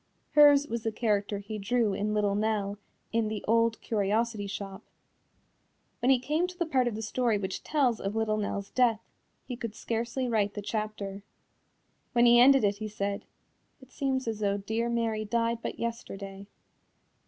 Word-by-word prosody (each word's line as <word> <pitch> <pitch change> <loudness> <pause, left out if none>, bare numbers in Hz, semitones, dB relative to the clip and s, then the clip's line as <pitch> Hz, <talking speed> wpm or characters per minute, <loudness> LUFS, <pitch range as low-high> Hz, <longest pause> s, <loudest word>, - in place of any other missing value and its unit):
Hers 290 -1 +7
was 235 -2 -3
the 225 - -1
character 210 -2 0
he 210 +2 -6
drew 220 0 +1
in 210 +2 -1
Little 205 -1 +2
Nell 205 -1 -1 0.3
in 225 -1 +2
The 215 -1 -4
Old 230 0 +3
Curiosity 215 0 0
Shop. 195 0 -6 1.2
When 250 - +1
he 265 - +6
came 300 +8 0
to 360 0 -10
the 345 - 0
part 260 -6 +2
of 235 - -2
the 220 - -5
story 230 0 +1
which 190 -1 -4
tells 265 -7 +1
of 195 +2 -3
Little 220 -1 +1
Nell's 200 -1 -3
death, 235 -4 +2 0.4
he 250 - -5
could 230 -3 -6
scarcely 235 +4 -2
write 210 -3 0
the 205 - -3
chapter. 210 -2 -4 0.9
When 240 0 +5
he 240 0 +7
ended 270 +1 +7
it 200 0 +2
he 215 +1 -4
said, 200 -1 -3 0.5
"It 260 -1 -17
seems 265 -2 -1
as 220 -2 -2
though 200 -1 +1
dear 220 +4 -2
Mary 230 -2 0
died 230 +2 0
but - - -4
yesterday." 200 -4 -6
220 Hz, 175 wpm, -29 LUFS, 205-240 Hz, 1.2 s, Hers